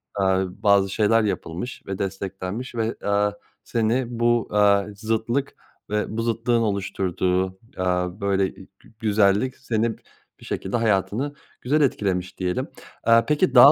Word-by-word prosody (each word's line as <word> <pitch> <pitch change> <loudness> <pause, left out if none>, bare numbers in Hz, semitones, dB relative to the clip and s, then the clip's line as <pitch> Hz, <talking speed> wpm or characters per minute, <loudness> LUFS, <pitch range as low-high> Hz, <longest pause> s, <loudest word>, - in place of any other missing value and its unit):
aaa, 95 -1 +2 0.2
bazı 100 -1 +4
şeyler 110 +2 +3
yapılmış 100 +3 -4
ve 95 -1 -4
desteklenmiş 95 +5 -4
ve, 115 0 -1
aaa, 100 0 +2 0.3
seni 115 +2 +1
bu, 120 -1 +2
aaa, 100 -1 +4
zıtlık 115 +5 -1 0.3
ve 105 0 0
bu - - +1
zıtlığın 115 +1 +1
oluşturduğu, 95 -2 -1 0.2
aaa, 90 +1 -1
böyle 100 -1 +2
i - - -12
gü - - -21
güzellik 105 +3 +2
seni 115 0 -1 0.4
bir - - -14
şekilde 95 +5 -2
hayatını 115 +6 0 0.3
güzel 150 +5 +2
etkilemiş 95 -9 0
diyelim. 90 -1 -1 0.4
Aaa, 115 0 +5
peki 150 -3 +1
daha 135 +4 +10
105 Hz, 135 wpm, -24 LUFS, 95-115 Hz, 0.4 s, daha